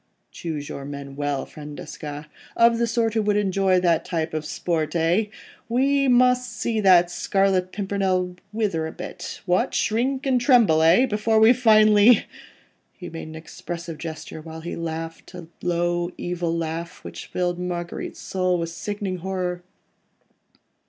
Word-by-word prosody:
Choose 155 -4 -5
your 140 - -6
men 140 -1 -7
well, 145 -1 -2
friend 150 -1 -10
Desgas... 150 -1 -7 0.3
of 230 0 +5
the 235 - +2
sort 230 -1 0
who 225 - +1
would 210 0 +1
enjoy 195 -2 +2
that 170 -2 +2
type 160 -2 -3
of 155 -1 -3
sport—eh? 165 +4 0 0.4
We 275 +3 +2
must 250 0 +3
see 225 -2 0
that 180 -3 +5
Scarlet 190 0 +1
Pimpernel 190 -3 -1 0.2
wither 200 -8 -1
a - - -6
bit—what?—shrink 235 - -1
and 255 -2 +2
tremble, 235 - +5
eh?... 170 +10 +6
before 220 -1 +1
we 220 +2 +7
finally.. 215 -2 +5 0.7
."—he 180 - -8
made 165 -1 -7
an 155 - -9
expressive 165 0 -7
gesture, 160 -1 -7
whilst 160 +1 -9
he 175 - -4
laughed 165 +1 -6
a 175 -2 -8 0.2
low, 175 0 0
evil 175 -1 -2
laugh, 165 +1 -5
which - - -8
filled 175 -1 -2
Marguerite's 175 -1 -5
soul 185 -1 0
with 165 -1 -3
sickening 195 +2 -4
horror. 180 -1 -3
180 Hz, 145 wpm, -23 LUFS, 165-215 Hz, 0.7 s, we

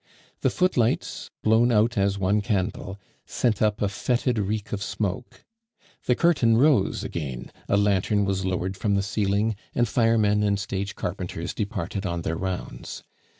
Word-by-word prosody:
The - - +2
footlights, 130 -11 0
blown 115 +3 +4
out 115 +1 +3
as 100 -1 +1
one 100 +2 +1
candle, 100 0 -2 0.3
sent 110 -5 0
up 105 -1 +2
a - - +3
fetid 120 +4 0
reek 105 +2 -2
of 100 - -2
smoke. 100 +3 -4 0.6
The 125 - +4
curtain 125 -10 +3
rose 135 -6 +3
again, 70 -7 -5 0.2
a 100 - +3
lantern 100 0 +2
was 95 0 -1
lowered 95 0 -2
from 100 +1 0
the 100 - +1
ceiling, 105 +1 0 0.2
and 120 - +2
firemen 110 -3 +3
and 100 -1 +1
stage 100 0 -3
carpenters 90 -2 -4
departed 100 -2 -3
on 85 -2 -3
their 80 - -1
rounds. 95 +1 -5
100 Hz, 150 wpm, -25 LUFS, 95-110 Hz, 0.6 s, blown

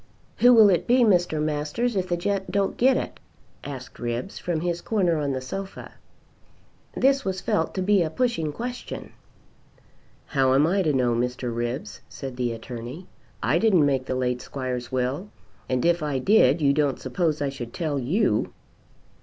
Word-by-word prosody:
"Who 245 - +6
will 215 -3 +8
it 180 - +1
be, 250 +2 +4
Mr. 175 -7 +3
Masters, 155 +11 -1
if 185 -1 -1
the 175 - +1
gent 195 +1 -2
don't 195 0 0
get 260 +1 +4
it?" - - -5 0.4
asked 130 -3 -8
Ribbs 120 +8 -4
from 170 -3 -2
his 175 0 -2
corner 185 -7 +1
on 145 -2 -1
the 130 - -3
sofa. 195 +10 -7 1.1
This 275 +1 +3
was 190 -1 -2
felt 160 -2 -1
to 185 - -1
be 200 0 +3
a 165 - 0
pushing 165 -5 -1
question. 245 +9 -6 1.1
"How 135 -3 +2
am 140 +3 +5
I 190 +4 +2
to 160 -5 +2
know, 125 -3 +2
Mr. 125 0 -2
Ribbs?" 120 +4 -4
said 135 -2 -7
the 125 -1 -1
Attorney. 120 +8 -7 0.4
"I 145 +8 +2
didn't 190 -8 +4
make 135 -2 0
the 130 - -1
late 125 -1 -1
squire's 125 -3 -5
will; 130 +9 -2 0.4
and 130 +2 0
if 170 0 +3
I 145 -3 -1
did 155 -1 +4
you 140 -1 +4
don't 145 -2 +1
suppose 155 +4 -1
I 145 -1 0
should 120 -4 -7
tell 150 -2 -2
you." 170 - +1
155 Hz, 175 wpm, -25 LUFS, 130-190 Hz, 1.1 s, will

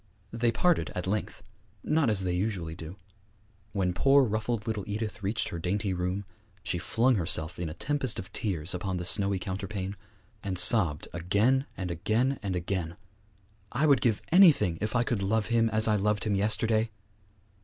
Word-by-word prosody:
They 115 0 +1
parted 175 +6 +1
at 90 - -3
length 105 +2 -3 0.4
not 150 -5 +2
as 100 -3 +1
they 90 -1 -1
usually 90 -4 -2
do. 80 +1 -9 0.8
When 95 -3 0
poor 135 +8 +4
ruffled 110 0 -2
little 110 -3 -2
Edith 105 +1 -4
reached 105 +3 -2
her 85 - -5
dainty 95 +3 -1
room, 90 +2 -2 0.4
she 90 -4 -2
flung 120 +6 +2
herself 85 -1 -1
in 85 -2 -3
a 75 - -8
tempest 135 +3 -1
of 95 +2 -8
tears 90 -5 -2
upon 90 +1 -3
the 90 - -3
snowy 100 +2 +1
counterpane, 95 +1 -4 0.5
and 95 -2 -3
sobbed 90 -7 +5
again 105 - +1
and 90 -2 -3
again 110 +10 0
and 95 -4 -3
again, 90 -1 -3 0.8
'I 140 +6 +1
would 140 -3 +4
give 115 -5 +1
anything 150 - +5
if 110 +3 -2
I 120 - +3
could 120 -4 -2
love 105 +2 +1
him 115 -1 +3
as 110 +1 +2
I 105 -1 +3
loved 105 +1 0
him 105 - 0
yesterday!' 110 +2 +1
100 Hz, 175 wpm, -28 LUFS, 90-115 Hz, 0.8 s, sobbed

